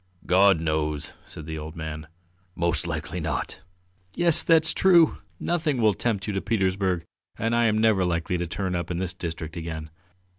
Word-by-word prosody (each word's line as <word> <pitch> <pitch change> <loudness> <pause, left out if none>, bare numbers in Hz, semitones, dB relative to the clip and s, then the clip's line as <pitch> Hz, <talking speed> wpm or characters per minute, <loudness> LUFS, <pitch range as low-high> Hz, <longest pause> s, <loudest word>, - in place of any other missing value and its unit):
"God 95 -1 +5
knows!" 75 -2 -2
said 80 - -9
the 80 0 -5
old 75 +1 -8
man. 80 -1 -6 0.5
"Most 85 0 -1
likely 80 +1 -4
not!" 75 -6 -3 0.5
"Yes, 170 -2 +5
that's 160 -1 +4
true! 175 -4 +5 0.2
Nothing 160 -6 0
will 110 -2 +4
tempt 100 -2 -1
you 105 - -3
to 95 - -1
Petersburg 95 -4 0 0.3
and 115 +1 -1
I 120 0 +3
am 110 -1 +2
never 110 -3 +3
likely 85 0 -1
to 85 - -2
turn 95 +2 -3
up 85 -1 -3
in 90 - -2
this 95 0 -3
district 80 -3 -6
again. 80 -2 -6
90 Hz, 175 wpm, -25 LUFS, 80-110 Hz, 0.5 s, God